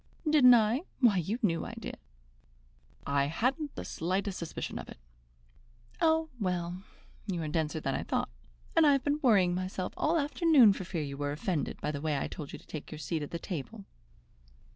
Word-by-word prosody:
"Didn't 270 Hz, -5 st, +8 dB
I? 225 Hz, +4 st, +3 dB, 0.2 s
Why, 235 Hz, -7 st, +5 dB
you 190 Hz, +6 st, -1 dB
knew 165 Hz, -5 st, +1 dB
I -, -, -7 dB
did." -, -, -7 dB, 1.1 s
"I 140 Hz, 0 st, +2 dB
hadn't 255 Hz, -, -1 dB
the -, -, -6 dB
slightest 190 Hz, +3 st, -2 dB
suspicion 170 Hz, -, -5 dB
of -, -, -9 dB
it." -, -, -10 dB, 1.0 s
"Oh, 320 Hz, -1 st, +3 dB
well, 180 Hz, -2 st, -2 dB, 0.5 s
you 185 Hz, -4 st, -2 dB
are -, -, -3 dB
denser 155 Hz, 0 st, -1 dB
than 135 Hz, -3 st, -2 dB
I -, -, -1 dB
thought. -, -, -1 dB, 0.5 s
And 330 Hz, -, +6 dB
I 290 Hz, -, +6 dB
have 275 Hz, -2 st, +1 dB
been 290 Hz, +1 st, 0 dB
worrying 195 Hz, -9 st, +4 dB
myself 185 Hz, 0 st, -3 dB
all 315 Hz, +3 st, +1 dB
the 325 Hz, -, +3 dB
afternoon 290 Hz, -, +5 dB
for 190 Hz, -, -6 dB
fear 170 Hz, -4 st, -3 dB
you 140 Hz, -1 st, -6 dB
were 145 Hz, 0 st, -2 dB
offended 160 Hz, +1 st, -2 dB
by 150 Hz, -, -1 dB
the 145 Hz, -2 st, -5 dB
way 155 Hz, -2 st, 0 dB
I -, -, -1 dB
told 150 Hz, -3 st, -7 dB
you -, -, -7 dB
to -, -, -18 dB
take 155 Hz, -, -8 dB
your 155 Hz, -, -6 dB
seat 155 Hz, +2 st, -3 dB
at 145 Hz, -, -5 dB
the 170 Hz, -, -4 dB
table." 190 Hz, +5 st, -6 dB
185 Hz, 200 wpm, -30 LUFS, 155-250 Hz, 1.1 s, Didn't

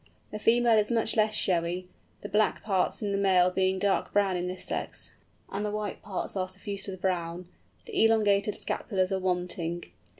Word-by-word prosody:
The 210 Hz, -, -5 dB
female 230 Hz, 0 st, +4 dB
is 210 Hz, -, +2 dB
much 225 Hz, -2 st, +2 dB
less 215 Hz, -1 st, +2 dB
showy, 180 Hz, -1 st, 0 dB, 0.3 s
the -, -, -5 dB
black 210 Hz, +2 st, +1 dB
parts 195 Hz, 0 st, 0 dB
in 205 Hz, -, -1 dB
the 200 Hz, -, 0 dB
male 185 Hz, -2 st, +4 dB
being 190 Hz, +1 st, +1 dB
dark 195 Hz, +1 st, +1 dB
brown 200 Hz, -2 st, +2 dB
in 180 Hz, 0 st, -2 dB
this 185 Hz, 0 st, -5 dB
sex, -, -, -4 dB, 0.4 s
and 200 Hz, +2 st, -2 dB
the 210 Hz, -, -1 dB
white 210 Hz, -1 st, -4 dB
parts 200 Hz, -1 st, -4 dB
are 185 Hz, -1 st, -1 dB
suffused 200 Hz, +2 st, -6 dB
with 190 Hz, -2 st, -6 dB
brown; 175 Hz, -1 st, -2 dB, 0.4 s
the 440 Hz, -, +1 dB
elongated 210 Hz, -2 st, +3 dB
scapulars 190 Hz, -3 st, -1 dB
are 190 Hz, -, +1 dB
wanting. 180 Hz, -2 st, -2 dB
195 Hz, 180 wpm, -28 LUFS, 185-210 Hz, 0.4 s, female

